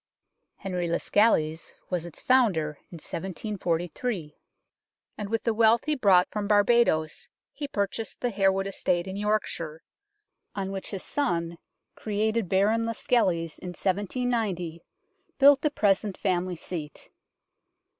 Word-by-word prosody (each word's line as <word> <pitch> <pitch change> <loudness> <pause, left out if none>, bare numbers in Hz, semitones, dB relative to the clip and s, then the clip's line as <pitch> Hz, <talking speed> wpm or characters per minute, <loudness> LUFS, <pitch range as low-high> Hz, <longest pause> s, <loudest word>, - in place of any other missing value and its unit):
Henry 180 -3 -3
Lascelles 165 -3 +1 0.2
was 175 -2 -1
its 170 - -11
founder 210 -13 +3 0.2
in - - -8
1743, 175 0 -3 0.8
and 210 -2 -5
with 225 0 -1
the 230 - +1
wealth 225 +1 +4
he 305 - +1
brought 195 -10 +4
from 210 -1 -3
Barbadoes 205 -7 +2 0.2
he 290 - -5
pur 200 -7 0
chased 220 +3 -7
the 245 - -1
Harewood 195 -1 +2
estate 180 -3 -1
in 190 0 -6
Yorkshire, 200 -6 -2 0.7
on 195 -1 -3
which 195 -1 -5
his 195 -3 -5
son, 170 -12 -2 0.3
created 215 -1 -1
Baron 210 +4 +3
Lascelles 185 -8 0
in 185 - -8
1790, 200 -4 -1 0.6
built 280 0 +7
the 300 - +2
present 205 -6 +1
family 185 -1 -1
seat. 160 -3 -7
195 Hz, 125 wpm, -27 LUFS, 175-225 Hz, 0.8 s, built